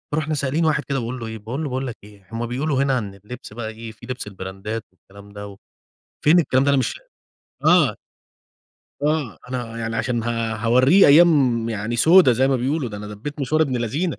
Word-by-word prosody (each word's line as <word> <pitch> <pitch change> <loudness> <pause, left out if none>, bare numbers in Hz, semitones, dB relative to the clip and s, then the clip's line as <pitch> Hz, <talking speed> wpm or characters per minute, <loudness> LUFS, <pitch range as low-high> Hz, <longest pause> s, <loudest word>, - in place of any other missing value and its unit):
رُحنا 155 0 -1
سائلين 145 +3 0
واحد 150 -1 +1
كده 140 - -3
وباقول 125 +2 -5
له 115 - -6
إيه؟ 110 0 -6
باقول 115 +8 -5
له: 145 - -3
"باقول 130 +1 -3
لك 120 - -6
إيه 100 -2 -17
هُم 115 +1 -3
بيقولوا 135 +2 0
هنا 135 -1 +1
عن 100 -4 -5
اللبس 105 +3 -11
بقى 110 -1 -5
إيه 110 +1 -9
في 110 +2 -15
لبس 125 -3 -5
البرندات 95 +3 -6
والكلام 100 +2 -17
ده 100 -1 -9 0.7
فين 160 +4 +6
الكلام 130 -5 +2
ده؟ 140 - +1
أنا 140 - +3
مش" 130 - -1 0.7
آه. - - +5 1.1
آه، 150 -7 -1
أنا 120 -2 -5
يعني 115 0 -3
عشان 115 +1 -1
ه - - -6 0.3
هاورّيه 125 - +5
أيام 140 -7 +5
يعني 110 +1 -3
سودا 165 +1 +6
زي 130 +3 +2
ما 135 - +2
بيقولوا، 135 +2 -1
ده 105 - -7
أنا 105 0 -7
دبّيت 105 +9 -7
مشوار 155 +4 +2
ابن 135 -5 -1
لذينة 140 +9 -2
125 Hz, 205 wpm, -22 LUFS, 110-140 Hz, 1.1 s, فين